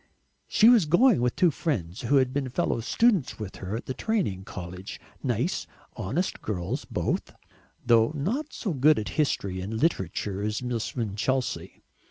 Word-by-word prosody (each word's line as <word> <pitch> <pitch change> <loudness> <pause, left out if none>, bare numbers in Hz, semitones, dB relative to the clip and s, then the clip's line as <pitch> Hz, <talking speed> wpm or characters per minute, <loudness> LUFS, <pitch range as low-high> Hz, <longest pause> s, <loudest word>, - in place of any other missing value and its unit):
She 220 - +5
was 235 -7 +7
going 190 - +5
with 125 0 +1
two 175 -3 +4
friends 100 - -3
who 125 +4 +1
had 130 -2 +3
been 140 -2 -1
fellow 120 - 0
students 195 - +2
with 105 -3 -7
her 95 +3 -4
at - - -8
the 130 - -3
training 150 - -1
college, 90 +1 -7 0.2
nice - - -1 0.3
honest 145 - -2
girls 90 -5 -3
both, - - -2 0.5
though 115 +1 +5
not 235 - -2
so 200 -7 -3
good 150 +2 +5
at 105 - -2
history 100 -11 -1
and 110 +4 -4
literature 100 - -1
as 105 +3 -2
Miss 120 -3 -3
Winchelsea. 120 +3 -2
125 Hz, 160 wpm, -27 LUFS, 100-160 Hz, 0.5 s, was